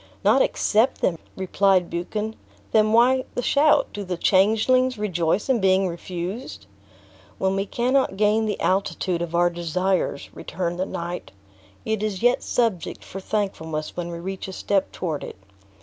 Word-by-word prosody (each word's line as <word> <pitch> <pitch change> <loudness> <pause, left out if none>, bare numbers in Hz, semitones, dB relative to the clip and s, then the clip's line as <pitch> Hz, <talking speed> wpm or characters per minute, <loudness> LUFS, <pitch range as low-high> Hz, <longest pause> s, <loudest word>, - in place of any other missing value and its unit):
"Not - - +5
accept 245 - +2
them!" 165 -3 +1 0.2
replied 190 -1 +2
Buchan; 210 +6 -3 0.4
"then 215 -1 +4
why 250 +3 +4
the 245 - -1
shout? 295 +4 +4
Do 205 - -4
the 180 -2 -4
changelings 220 +8 +3
rejoice 180 -2 0
in 260 -3 +2
being 190 0 +3
refused?" 175 - -6 0.7
"When 190 0 0
we 195 +1 -1
cannot 250 -3 +1
gain 215 +1 +2
the 210 - -2
altitude 185 -2 0
of 170 0 -3
our 175 0 +3
desires," 175 -2 -1
returned 175 +1 -4
the 185 - -1
knight, 175 - -5 0.5
"it 220 -1 -1
is 210 -2 -3
yet 245 +1 +4
subject 225 -8 -1
for 195 - -7
thankfulness 160 -7 -3
when 175 -1 -4
we 170 - -5
reach 190 +3 -5
a 190 - -7
step 195 +1 0
toward 160 -5 -3
it. - - -7
190 Hz, 155 wpm, -24 LUFS, 175-220 Hz, 0.7 s, Not